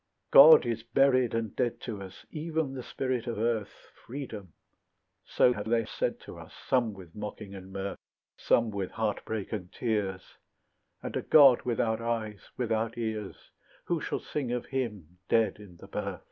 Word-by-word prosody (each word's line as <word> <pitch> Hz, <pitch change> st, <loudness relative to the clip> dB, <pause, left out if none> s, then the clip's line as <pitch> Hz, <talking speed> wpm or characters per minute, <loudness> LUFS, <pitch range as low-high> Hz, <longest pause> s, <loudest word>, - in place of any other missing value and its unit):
God 155 Hz, +3 st, +10 dB
is 115 Hz, -1 st, -2 dB
buried 130 Hz, 0 st, +3 dB
and 115 Hz, -2 st, -2 dB
dead 120 Hz, -2 st, -1 dB
to 105 Hz, -5 st, -5 dB
us, 95 Hz, -1 st, -11 dB
Even 155 Hz, -2 st, -2 dB
the 130 Hz, -, -5 dB
spirit 130 Hz, -1 st, -3 dB
of 115 Hz, -, -3 dB
earth, 110 Hz, -1 st, -2 dB
Freedom; 115 Hz, -, -7 dB, 0.7 s
so 125 Hz, -, +3 dB
have 105 Hz, -1 st, -5 dB
they 115 Hz, -1 st, +2 dB
said -, -, -2 dB
to -, -, -10 dB
us, -, -, -12 dB
Some 120 Hz, -4 st, +2 dB
with 90 Hz, -4 st, -13 dB
mocking 105 Hz, -1 st, -7 dB
and 95 Hz, -1 st, -10 dB
mirth, 95 Hz, 0 st, -5 dB, 0.4 s
Some 115 Hz, -2 st, +2 dB
with 100 Hz, -2 st, -3 dB
heartbreak 110 Hz, -1 st, -3 dB
and 90 Hz, -4 st, -5 dB
tears; 100 Hz, -5 st, -2 dB, 0.8 s
And -, -, -5 dB
a -, -, 0 dB
God 140 Hz, -5 st, +7 dB
without 115 Hz, -2 st, 0 dB
eyes, 110 Hz, -3 st, -3 dB
without 115 Hz, -1 st, -1 dB
ears, 110 Hz, -3 st, -5 dB, 0.3 s
Who 170 Hz, -3 st, -1 dB
shall -, -, -2 dB
sing 135 Hz, -5 st, -3 dB
of 125 Hz, -1 st, -2 dB
him, 105 Hz, -, -4 dB
dead 110 Hz, -3 st, +2 dB
in 100 Hz, -4 st, -13 dB
the -, -, -13 dB
birth? -, -, -4 dB
115 Hz, 165 wpm, -29 LUFS, 105-125 Hz, 0.8 s, God